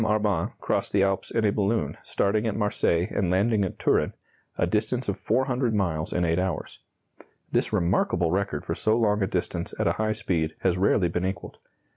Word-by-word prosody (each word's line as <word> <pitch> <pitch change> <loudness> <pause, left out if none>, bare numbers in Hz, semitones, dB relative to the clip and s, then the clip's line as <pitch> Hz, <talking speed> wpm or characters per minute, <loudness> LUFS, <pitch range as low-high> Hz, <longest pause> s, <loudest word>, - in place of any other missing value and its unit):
Arban 105 -5 +1
crossed - - -1
the 100 -1 +4
Alps 95 -1 0
in 115 -1 0
a 105 - +4
balloon, 105 +2 0
starting 105 +3 0
at 105 - -1
Marseilles 100 -4 +1
and 95 -3 +1
landing 100 +3 +2
at 95 - -3
Turin - - +1 0.4
a - - +2
distance 115 +4 -1
of - - 0
400 125 -2 0
miles 80 -6 -1
in 90 - +1
8 85 +1 +1
hours. 90 -4 -3 0.7
This - - +1
remarkable 85 -1 +1
record 100 +1 -1
for - - -1
so 110 +1 +1
long 105 -2 +2
a 95 - +2
distance 90 -2 -3
at - - 0
a - - +3
high 110 0 +1
speed 80 -6 -1
has 90 -2 +2
rarely 95 0 +3
been 90 +1 -2
equalled. 95 +1 -4
100 Hz, 190 wpm, -26 LUFS, 90-110 Hz, 0.7 s, the